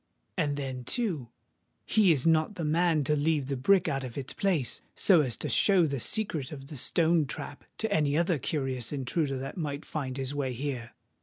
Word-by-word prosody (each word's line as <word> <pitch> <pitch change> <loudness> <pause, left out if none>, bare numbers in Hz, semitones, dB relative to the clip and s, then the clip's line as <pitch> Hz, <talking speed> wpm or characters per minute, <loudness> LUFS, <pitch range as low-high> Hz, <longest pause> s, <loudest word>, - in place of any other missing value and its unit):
And 145 -5 0
then, 130 -3 -4
too, 160 - -2 0.6
he 210 -5 +4
is 140 -5 +2
not 160 +4 +3
the 170 - -3
man 160 0 +2
to 150 +3 +1
leave 150 -1 +1
the 140 +1 -2
brick 175 +9 +3
out 135 -1 -1
of 125 -1 -7
its 135 -1 -5
place, 170 -11 0
so 180 -5 +5
as 125 -5 -2
to - - -4
show 190 -4 +4
the 140 -3 -2
secret 160 - -1
of 135 -2 -8
the 150 - -6
stone 165 +3 +2
trap 145 - -7
to 220 -2 -1
any 150 -3 +2
other 170 -2 +2
curious 130 -4 -2
intruder 135 +1 -1
that 135 +6 -6
might 145 -3 -4
find 135 -4 -4
his 135 0 -3
way 135 -3 -2
here. 125 -2 -4
145 Hz, 200 wpm, -29 LUFS, 135-165 Hz, 0.6 s, so